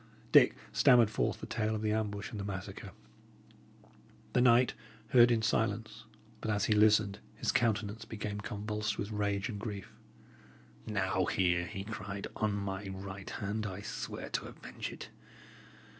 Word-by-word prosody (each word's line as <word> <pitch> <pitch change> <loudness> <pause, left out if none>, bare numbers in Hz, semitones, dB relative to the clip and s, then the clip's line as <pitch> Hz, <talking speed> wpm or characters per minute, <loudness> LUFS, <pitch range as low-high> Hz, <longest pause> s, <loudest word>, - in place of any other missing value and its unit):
Dick - - +7 0.2
stammered 120 -5 +6
forth - - -1
the - - -4
tale 110 -1 -1
of 110 - -3
the 105 - +1
ambush 105 0 -2
and 110 - -5
the - - -3
massacre. 95 -2 -6 1.4
The 125 - +4
knight 125 0 +5 0.4
heard 120 -2 +7
in 115 -2 +2
silence; 110 +1 -1 0.4
but - - -3
as 105 -2 +1
he 110 - +3
listened, 105 -1 +4 0.2
his - - 0
countenance 110 -2 0
became 105 -2 -4
convulsed 105 -1 -3
with 100 +2 -3
rage 100 -1 0
and 105 -4 -5
grief. 100 -3 -6 0.9
"Now 95 -3 +1
here," 90 -3 +1
he 100 -1 -5
cried, 100 -2 -5
"on 110 -1 0
my 100 0 -3
right 95 0 -7
hand, 105 +1 -3
I 95 0 -6
swear - - -5
to - - -2
avenge - - -7
it! - - -9
105 Hz, 155 wpm, -32 LUFS, 100-110 Hz, 1.4 s, Dick